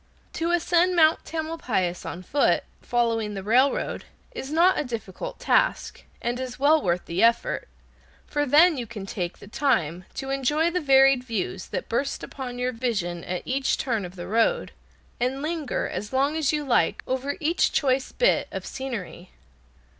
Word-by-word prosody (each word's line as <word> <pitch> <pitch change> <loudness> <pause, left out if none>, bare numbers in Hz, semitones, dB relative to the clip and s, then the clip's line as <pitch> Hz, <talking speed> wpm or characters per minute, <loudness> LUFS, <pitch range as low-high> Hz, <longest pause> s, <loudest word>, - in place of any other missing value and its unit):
To 330 +1 -1
ascend 350 +1 +2
Mount 315 -2 +4
Tamalpais 310 - -2
on 180 - -6
foot, 285 +10 +2 0.2
following 230 -3 0
the 195 - -5
railroad, 255 +7 +2 0.3
is 270 - -6
not 345 +4 +4
a - - 0
difficult 230 -7 -6
task, - - +1 0.2
and 240 +1 -1
is 255 -1 -5
well 295 +3 +4
worth 175 -1 0
the 170 +2 -2
effort, 230 0 +2 0.6
for 290 0 -1
then 315 +4 +6
you 240 -2 -4
can 210 -3 -7
take 180 -3 -4
time 180 - 0
to 270 0 -4
enjoy 295 +5 +1
the 360 +1 -1
varied 270 -2 +5
views 200 -5 -3
that - - -4
burst 275 +4 -2
upon 250 -3 -6
your 250 +1 -1
vision 200 -9 -2
at 180 0 -3
each 265 +1 0
turn 230 -6 -1
of 180 +1 -8
the 175 -1 -7
road, 225 +5 +1 0.5
and 260 +3 -1
linger 310 -4 -2
as 210 - -5
long 275 +3 +1
as 310 -3 +1
you 300 -1 -1
like 260 -4 +1
over 265 +2 -2
each 325 +3 +2
choice 265 -2 +1
bit - - +2
of - - -5
scenery. 220 -9 -6
260 Hz, 165 wpm, -25 LUFS, 220-295 Hz, 0.6 s, then